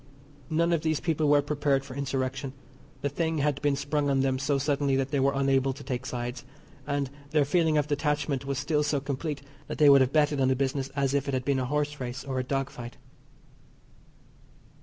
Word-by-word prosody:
None 170 +2 +2
of 165 - +1
these 155 -2 0
people 155 -3 +1
were 145 -1 +5
prepared 145 -2 0
for 130 - -9
Insurrection. 135 -1 -2 0.5
The 145 - 0
thing 160 +3 -1
had 145 -1 0
been 145 -1 +2
sprung 145 +1 -1
on 135 -1 +2
them 135 -1 +1
so 140 +1 +1
suddenly 140 0 +1
that 135 +1 -1
they 140 - +1
were 140 +1 +2
unable 135 -1 +2
to 140 +2 -11
take 130 0 -4
sides, 120 0 -4 0.4
and 140 -2 -1 0.2
their 150 -1 +3
feeling 160 +1 +2
of 145 - +2
detachment 145 -2 -1
was 140 -1 -3
still 150 +1 +1
so 145 -1 +1
complete 140 +1 -4 0.2
that - - -5
they 150 -2 +6
would 140 -1 +7
have 130 0 +2
betted 150 -2 +2
on 130 - +4
the 130 - +3
business 135 0 -1
as 140 -1 +1
if 140 0 0
it 140 - 0
had 130 0 -2
been 140 -2 +1
a 130 - -1
horse 150 +2 -1
race 125 0 -5
or 130 -1 -3
a - - 0
dog 135 +1 -2
fight. 120 0 -9
140 Hz, 215 wpm, -28 LUFS, 135-150 Hz, 0.5 s, would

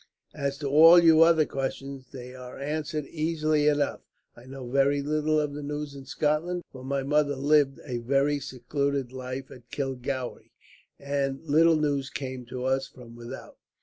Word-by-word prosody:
As 140 -2 -3
to 145 - -4
all 160 +5 +8
your 165 -1 +7
other 160 -2 +4
questions, 135 -1 -5
they 125 -2 -9
are 125 -1 -10
answered 150 +1 -3
easily 155 -1 0
enough. 145 -1 +1 0.3
I 120 - -15
know 130 -1 -8
very 140 +2 +2
little 155 +1 +1
of 150 -1 -2
the 145 - -6
news 145 0 -5
in 135 -1 -10
Scotland, 160 +6 -1
for 130 -1 -11
my 135 +1 -2
mother 145 0 +1
lived 140 0 +2
a 125 -4 -3
very 140 +4 +1
secluded 140 0 -2
life 130 +1 -6
at 120 -1 -14
Kilgowrie, 130 -2 -4 0.5
and 140 0 -2
little 165 +2 +4
news 145 -3 0
came 130 -2 -6
to 125 +1 -5
us 135 +1 0
from 120 -2 -14
without. 120 0 -10
140 Hz, 165 wpm, -27 LUFS, 130-150 Hz, 0.5 s, all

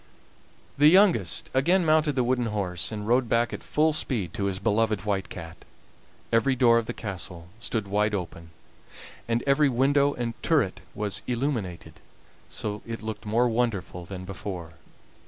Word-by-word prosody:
The 145 - +7
youngest 165 - +4
again 170 +8 +3
mounted 155 -2 +3
the 130 - +2
wooden 125 -1 +1
horse, 95 -5 -3
and 105 -1 -5
rode 120 0 +2
back 115 0 +1
at - - -5
full 155 +1 +1
speed 105 - -1
to 100 - -2
his 95 -1 -1
beloved 105 +1 0
White 100 -2 -1
Cat. 80 -2 -8 0.8
Every 115 +4 +3
door 120 -2 +5
of 115 - -5
the - - -3
castle 90 -4 -6
stood 110 -3 -3
wide 105 +1 +1
open, 85 -3 -6 0.8
and 115 0 0
every 140 +1 +4
window 140 +3 +2
and 120 -1 -3
turret 145 - +1
was 105 -1 -1
illuminated, 120 -8 -3 0.5
so 105 0 -4
it 115 -1 -6
looked 110 -1 -6
more 115 +4 +3
wonderful 110 -6 -1
than 95 0 -7
before. 90 -3 -7
115 Hz, 155 wpm, -26 LUFS, 100-130 Hz, 0.8 s, The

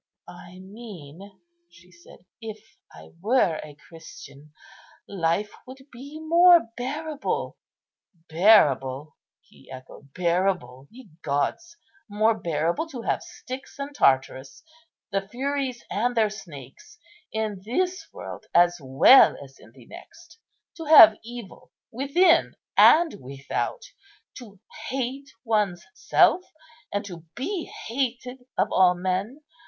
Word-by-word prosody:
"I 175 +1 -13
mean," 190 -2 -12 0.3
she 175 +1 -21
said, 175 +1 -19 0.2
"if 220 -2 -7 0.3
I 80 0 -15
were 205 -6 +1
a 150 -1 -13
Christian, 150 -3 -14 0.6
life 190 +2 -1 0.2
would 260 +1 -11
be 280 +5 -11
more 335 -3 +5
bearable." 295 +4 -4 0.7
"Bearable!" 150 - +3 0.3
he - - -22
echoed; 130 +2 -13
"bearable! 170 -7 -1
ye 245 -5 -16
gods! 335 - -3 0.3
more 215 +2 +2
bearable 170 - -2
to 255 -7 -8
have - - -1
Styx 260 +2 -10
and 280 +1 -6
Tartarus, 135 - 0 0.5
the 195 -1 -2
Furies 260 +1 -3
and 240 +4 -1
their 215 -2 +2
snakes, 185 - -12 0.3
in 215 -3 -4
this 365 - -2
world - - -10
as 175 0 +4
well 135 - +6
as 135 -1 -17
in 110 - -18
the 125 -1 -18
next? 340 - -15 0.4
to 325 - -7
have 315 +1 +9
evil 235 -3 -11 0.2
within 330 +7 +2 0.2
and 330 0 +5
without, 135 - -5 0.6
to 205 -6 -14 0.3
hate 270 +2 -4
one's 210 -7 -1
self - - +3 0.5
and 205 0 -3
to 175 -4 -9 0.2
be 335 +7 -4
hated 250 +1 -5 0.2
of - - +1
all 180 -1 +4
men! 190 +10 -3
210 Hz, 115 wpm, -24 LUFS, 170-265 Hz, 0.7 s, have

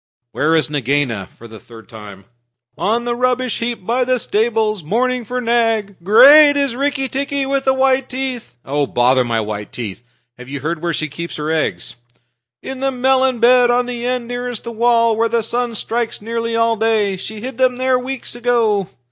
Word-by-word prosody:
"Where 160 +2 +1
is 160 - +2
Nagaina, 135 -8 -1
for 115 - -15
the 110 -1 -12
third 115 -1 -15
time?" 100 -3 -12 0.5
"On 230 +4 0
the 240 0 -2
rubbish 255 0 0
heap 230 -5 -4
by 245 +4 +1
the 255 0 +1
stables, 220 -3 0
mourning 245 +8 0
for 250 +3 -4
Nag. 225 -4 0
Great 285 - +7
is 280 -4 0
Rikki 275 0 -1
tikki 275 +1 -2
with 275 0 -1
the 265 - +3
white 265 0 +1
teeth." 255 - -5
"Bother 130 -2 +1
my 115 -2 -1
white 105 -1 -5
teeth! 110 -4 -6 0.4
Have 125 +1 -11
you 140 - -4
ever 140 +3 -5
heard 170 -2 -4
where 170 -1 -1
she 155 - -2
keeps 170 +4 -7
her 150 +1 -3
eggs?" 155 -6 -2 0.7
"In 265 -1 -6
the 270 0 0
melon 260 -1 +1
bed, 245 +1 +5
on 245 +1 +2
the 240 -1 -5
end 250 -1 -2
nearest 245 -1 -4
the 235 - -6
wall, 230 0 +2
where 230 +1 +1
the 230 -1 0
sun 240 +1 -1
strikes 230 +2 -2
nearly 230 +1 -3
all 230 0 +2
day. 215 -3 +1
She 210 +3 -7
hid 255 +1 -7
them 255 -1 +3
there 255 0 +1
weeks 260 0 -5
ago." 230 -5 +1
230 Hz, 190 wpm, -18 LUFS, 170-250 Hz, 0.7 s, Great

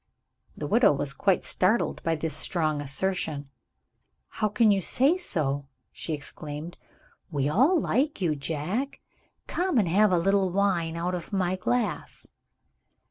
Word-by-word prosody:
The 150 - -4
widow 230 - +4
was 140 0 -1
quite 195 +3 +1
startled 205 +6 +1
by 165 0 0
this 155 -1 -3
strong 155 -2 0
assertion. 145 -1 -2 0.8
"How 215 - -1
can 215 +1 +4
you 195 -1 +2
say 270 - +3
so?" 145 - -2 0.2
she 160 - -5
exclaimed. 150 +3 -7 0.5
"We 145 -4 0
all 265 - +4
like 280 +1 0
you, 170 -5 +1
Jack. 165 - -3 0.4
Come 360 -5 0
and 205 -6 +3
have 205 +4 +4
a 180 - +4
little 195 +2 +2
wine, 175 -4 0
out 175 +2 -2
of 175 +1 -5
my 185 -2 0
glass." 240 +6 -2
180 Hz, 140 wpm, -27 LUFS, 155-210 Hz, 0.8 s, widow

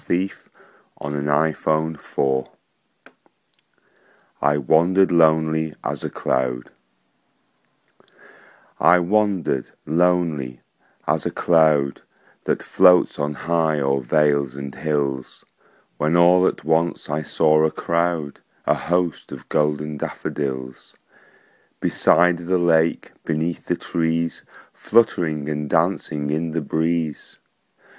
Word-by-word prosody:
William 95 +3 0 1.3
Wordsworth 75 -4 -1 1.9
I 75 +1 +2
Wandered 85 +7 +3
Lonely 80 -1 +2
As - - -4
a - - -3
Cloud 60 -1 -2 2.1
I 90 - +6
WANDERED 90 - 0 0.2
lonely 80 -6 0 0.4
as - - 0
a - - 0
cloud 80 -5 +2 0.4
That - - -1
floats 90 -1 +4
on 75 +1 -1
high 80 -1 0
o'er 70 -1 0
vales 70 0 +1
and 70 -1 -7
hills, 70 -4 -3 0.5
When 75 +3 +2
all 90 +2 +5
at - - -3
once 80 +2 0
I 75 +1 -2
saw 75 +1 +2
a 80 - +3
crowd, 85 -3 -2 0.3
A - - +3
host, 85 -2 -2
of - - -10
golden 75 0 -1
daffodils; 65 -3 -5 0.8
Beside 90 0 +3
the 95 0 +2
lake, 85 -2 +1
beneath 80 +2 -3
the - - +1
trees, 85 0 -2 0.3
Fluttering 85 -10 +1
and 75 -1 -3
dancing 80 -4 0
in 80 +1 -2
the 85 - -1
breeze. 80 0 -2
80 Hz, 100 wpm, -21 LUFS, 75-85 Hz, 2.1 s, I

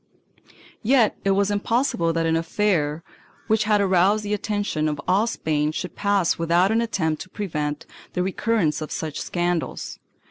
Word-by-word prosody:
2 - - -24 0.3
Yet 240 -1 +3
it 200 - +1
was 200 +1 +2
impossible 205 -4 +1
that 165 0 0
an 165 0 +2
affair 165 -3 0 0.4
which 220 0 +2
had 210 -1 +3
aroused 195 +2 +3
the 205 0 -2
attention 205 -7 -1
of 150 -1 -2
all 200 +5 +3
Spain 150 -8 -1
should 170 +2 -5
pass 200 -5 +1
without 170 +4 +3
an 225 +1 +2
attempt 160 -9 -1
to 185 - -8
prevent 150 -8 -3 0.3
the 180 - 0
recurrence 190 -5 0
of 155 - -5
such 155 -2 -4
scandals. 175 -1 -2
185 Hz, 165 wpm, -23 LUFS, 160-210 Hz, 0.4 s, Yet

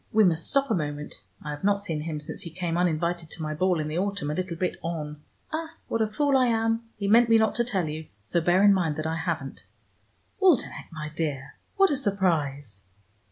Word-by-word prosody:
We 220 0 +5
must 165 -4 +2
stop 275 -1 +2
a - - +4
moment: 150 -3 -3 0.3
I 150 - -4
have 145 +3 -7
not 200 0 +3
seen 165 -7 -3
him 155 -1 -4
since 150 - -6
he 170 - -6
came 170 0 -3
uninvited 170 -1 0
to 160 - -7
my 155 0 -2
ball 180 +2 +1
in 155 - -2
the 155 +3 -2
autumn, 200 -6 -1
a - - -1
little 180 0 -3
bit 180 +1 -1
on. 150 -3 -4 0.3
Ah, 325 +1 -4
what 230 - 0
a 220 - +3
fool 280 +6 +1
I 255 -1 +5
am: 225 0 +1 0.2
he 200 - -2
meant 230 +3 +6
me 225 - +7
not 220 -1 +3
to 240 - +3
tell 195 -8 -1
you, 155 +1 -5 0.2
so 140 +12 0
bear 175 +4 +4
in 205 -1 +7
mind 170 -6 +1
that 155 - -3
I 160 +1 -1
haven't. 160 -8 -3 0.8
Waldenech, 360 -10 +2
my 155 -1 -5
dear, 145 -5 -3 0.2
what 390 -3 +5
a 285 - +1
surprise!" 145 - -1
175 Hz, 225 wpm, -27 LUFS, 155-210 Hz, 0.8 s, me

